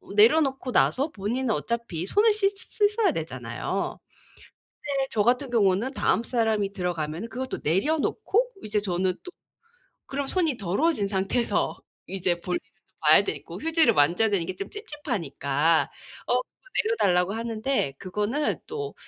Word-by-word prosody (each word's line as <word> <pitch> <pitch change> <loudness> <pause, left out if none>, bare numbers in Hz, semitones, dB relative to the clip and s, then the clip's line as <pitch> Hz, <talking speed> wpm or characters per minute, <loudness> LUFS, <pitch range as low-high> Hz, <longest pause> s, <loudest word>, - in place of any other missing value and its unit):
내려놓고 265 +4 +4
나서 275 +5 +2
본인은 230 +4 -2
어차피 225 -8 -3
손을 425 - +4
씻 410 -2 +2
씻어야 420 +2 +1
되잖아요. - - -4 0.8
근데 275 -2 -1
저 215 - +2
같은 250 +4 +1
경우는 215 +2 +2
다음 230 - +2
사람이 220 -5 0
들어가면은 175 0 -3
그거 255 +3 -4
또 - - -5
내려놓고 320 - +1
이제 210 0 0
저는 185 -2 0
또 360 - -8 0.8
그럼 275 0 -3
손이 325 -5 +1
더러워진 210 - +1
상태에서 195 +5 0 0.3
이제 180 -2 -1
볼일을 180 0 -2 0.3
또 - - -37
봐야 - - +7
되고 - - -6
휴지를 320 -6 +4
만져야 170 +10 +4
되는 195 -5 0
게 185 - -5
좀 195 +2 -6
찝찝하니까 165 - -1 0.4
어 - - +2
그거 - - -22 0.2
내려 445 +2 0
달라고 180 - +2
하는데 225 - -1
그거는 210 +10 -1
또 430 -2 -5
225 Hz, 325 characters per minute, -26 LUFS, 190-295 Hz, 0.8 s, 봐야